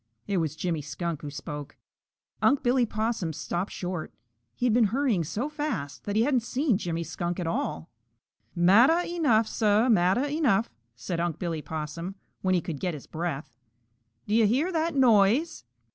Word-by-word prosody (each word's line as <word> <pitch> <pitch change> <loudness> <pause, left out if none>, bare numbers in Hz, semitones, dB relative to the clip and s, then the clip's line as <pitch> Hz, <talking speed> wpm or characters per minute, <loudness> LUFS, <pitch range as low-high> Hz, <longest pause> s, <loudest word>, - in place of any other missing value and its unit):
It 200 - -1
was 160 -3 -1
Jimmy 165 -1 -2
Skunk 165 +1 -4
who 145 - -5
spoke. 145 0 -7 0.6
Unc' 280 0 +3
Billy 245 -1 +3
Possum 215 -6 -2
stopped 175 +6 -3
short. 180 -3 -4 0.4
He 245 - -2
had 240 - +3
been 235 -1 +5
hurrying 230 -4 +1
so 210 - -3
fast 295 - -4
that 205 - -2
he 220 - +4
hadn't 260 -1 +3
seen 245 -1 0
Jimmy 170 -4 -2
Skunk 175 +2 -4
at 175 - -2
all. 80 - -3 0.6
"Matter 225 - +5
enuff, 290 -11 +2
Suh! 220 +3 +2
Matter 195 +6 +3
enuff!" 280 -8 +1 0.2
said 165 +8 -4
Unc' 170 -2 -1
Billy 165 -3 -3
Possum, 160 +5 -5 0.3
when 185 -1 +2
he 175 - +2
could 155 -3 -5
get 180 -4 -2
his 145 - -10
breath. 155 -6 -4 0.7
"Do 210 - -2
you 225 -1 +5
hear 280 - +1
that 325 -2 0
noise?" 245 - +3
195 Hz, 170 wpm, -27 LUFS, 170-245 Hz, 0.7 s, been